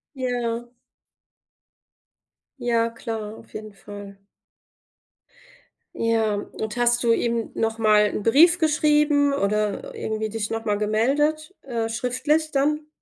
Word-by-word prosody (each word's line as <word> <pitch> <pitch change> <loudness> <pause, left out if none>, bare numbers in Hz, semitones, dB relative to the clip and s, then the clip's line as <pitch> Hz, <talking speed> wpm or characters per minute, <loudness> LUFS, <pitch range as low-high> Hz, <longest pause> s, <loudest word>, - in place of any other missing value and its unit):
Ja. 240 -2 -3 1.9
Ja, 235 -2 +1
klar, 225 -2 -6
auf - - -17
jeden 215 -1 -8
Fall. 200 0 -10 1.8
Ja, 225 -2 +1
und 215 +1 -5
hast 240 0 +2
du 235 - +3
ihm 230 -1 -1
noch 225 0 -1
mal 215 -2 +4
'n 210 - -3
Brief 325 - +6
geschrieben 300 -2 +3
oder 210 - -1
irgendwie 220 - -3
dich 215 -1 -3
noch 225 0 -4
mal 210 -2 +1
gemeldet, 290 - +1
äh, 230 -4 -3
schriftlich 260 +7 0
dann? 300 +1 0
230 Hz, 115 wpm, -24 LUFS, 220-285 Hz, 1.9 s, Brief